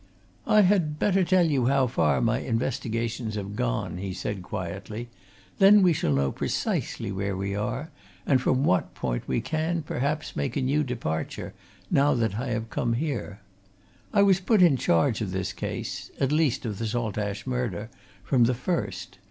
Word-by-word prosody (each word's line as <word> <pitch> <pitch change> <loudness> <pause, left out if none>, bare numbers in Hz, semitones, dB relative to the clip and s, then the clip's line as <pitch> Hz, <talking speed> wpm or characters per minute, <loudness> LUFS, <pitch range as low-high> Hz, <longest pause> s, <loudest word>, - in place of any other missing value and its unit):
"I 215 - +6
had 180 -6 +2
better 195 +2 +2
tell 180 0 +4
you 135 -6 +2
how 135 0 +3
far 75 - +1
my - - +2
investigations 115 -2 -2
have 100 0 -5
gone," - - -2
he 95 -1 -4
said 100 0 -4
quietly. 100 +6 -6 0.5
"Then 200 +1 +7
we 180 -2 +5
shall 110 - 0
know 70 -1 +2
precisely 100 - -2
where 100 0 -2
we 100 +1 -2
are, 115 - -3 0.3
and 130 -3 +3
from 130 +1 +2
what 95 - +1
point - - -3
we 120 - 0
can, 160 +5 -1
perhaps, 145 +2 -2
make 135 -2 -2
a - - +1
new 145 +4 +2
departure, 110 - -4 0.4
now 140 0 +4
that 110 -3 0
I 130 - -3
have 115 -1 -3
come 120 -1 0
here. 120 -7 -3 0.7
I 200 -2 +4
was 195 -2 +4
put 195 0 +4
in 165 -6 +6
charge 110 -1 +2
of 105 - -2
this 95 0 -3
case - - -5
at 135 0 +1
least 150 -4 +1
of 105 -4 -4
the 115 - -1
Saltash 105 -3 -2
murder 120 -4 -3 0.3
from 125 -1 +3
the 125 +1 +1
first. 170 +8 -3
120 Hz, 175 wpm, -26 LUFS, 100-150 Hz, 0.7 s, Then